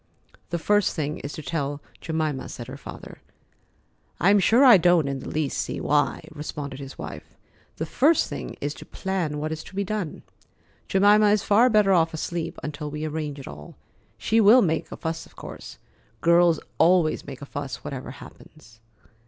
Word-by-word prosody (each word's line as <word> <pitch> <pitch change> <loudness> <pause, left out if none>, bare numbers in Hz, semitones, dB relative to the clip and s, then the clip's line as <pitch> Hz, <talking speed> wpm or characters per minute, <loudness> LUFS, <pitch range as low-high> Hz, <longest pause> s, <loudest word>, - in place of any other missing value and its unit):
"The 170 - -1
first 205 +4 +2
thing 150 -1 -3
is 145 - -6
to 155 - -7
tell 145 -1 -3 0.2
Jemima," 155 -4 -2
said 120 - -7
her 130 +3 -8
father. 140 - -11 1.0
"I'm 200 +4 +5
sure 230 +8 +5
I 240 -6 +9
don't 175 -4 +3
in 135 -1 -3
the - - -8
least 150 -3 -2
see - - -3
why," 145 -1 0
responded 145 -3 -6
his 135 -1 -9
wife. - - -9 0.4
"The - - -3
first 310 +4 +3
thing - - -6
is 145 +1 -3
to - - -12
plan 185 -6 -3
what 155 +1 -3
is 160 0 -5
to - - -13
be 200 - 0
done. 200 -5 -4 0.6
Jemima 205 +2 +5
is 205 -1 +2
far 230 +5 +5
better 210 -4 +4
off 165 -2 +2
asleep 165 +1 -4
until 150 0 -5
we 150 +1 -4
arrange 150 -2 -4
it 135 - -9
all. 75 +1 -10 0.4
She 220 - +2
will 220 +5 +7
make 160 -3 -1
a - - -6
fuss, 165 0 -4
of - - -24
course. - - -10 0.4
Girls 170 -1 +4 0.2
always 170 -4 +3
make 140 -1 -8
a - - -6
fuss, 140 -1 -6
whatever 135 -1 -6
happens." 130 -3 -14
160 Hz, 180 wpm, -25 LUFS, 145-195 Hz, 1.0 s, I